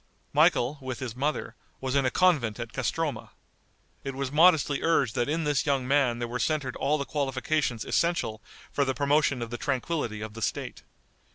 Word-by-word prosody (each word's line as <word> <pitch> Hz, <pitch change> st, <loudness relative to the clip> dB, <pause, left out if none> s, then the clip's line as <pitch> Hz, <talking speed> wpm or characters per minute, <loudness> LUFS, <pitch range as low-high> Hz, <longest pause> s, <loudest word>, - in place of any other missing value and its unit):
Michael, 135 Hz, +5 st, +3 dB
with 130 Hz, -2 st, -4 dB
his 120 Hz, -3 st, -5 dB
mother, 145 Hz, +4 st, -2 dB, 0.2 s
was 130 Hz, -1 st, -3 dB
in 140 Hz, -2 st, +3 dB
a -, -, +3 dB
convent 140 Hz, -11 st, +2 dB
at 115 Hz, -1 st, -6 dB
Castroma. 145 Hz, +4 st, -2 dB, 0.7 s
It 135 Hz, -1 st, -4 dB
was 135 Hz, -1 st, -3 dB
modestly 155 Hz, -2 st, +4 dB
urged 140 Hz, -8 st, +2 dB
that 120 Hz, +3 st, 0 dB
in 160 Hz, +2 st, 0 dB
this 145 Hz, 0 st, 0 dB
young 135 Hz, -3 st, +1 dB
man 135 Hz, -4 st, +3 dB
there 120 Hz, 0 st, -3 dB
were 125 Hz, +1 st, -4 dB
centered 145 Hz, -4 st, -1 dB
all 150 Hz, +2 st, +1 dB
the 140 Hz, -, -3 dB
qualifications 135 Hz, -3 st, -1 dB
essential 170 Hz, -11 st, 0 dB, 0.3 s
for 140 Hz, -, +1 dB
the 130 Hz, -1 st, -1 dB
promotion 140 Hz, -3 st, +2 dB
of 115 Hz, -, -7 dB
the 120 Hz, -, -4 dB
tranquillity 130 Hz, -5 st, -2 dB
of 110 Hz, 0 st, -6 dB
the 115 Hz, -, -8 dB
State. -, -, -3 dB
135 Hz, 185 wpm, -27 LUFS, 120-150 Hz, 0.7 s, modestly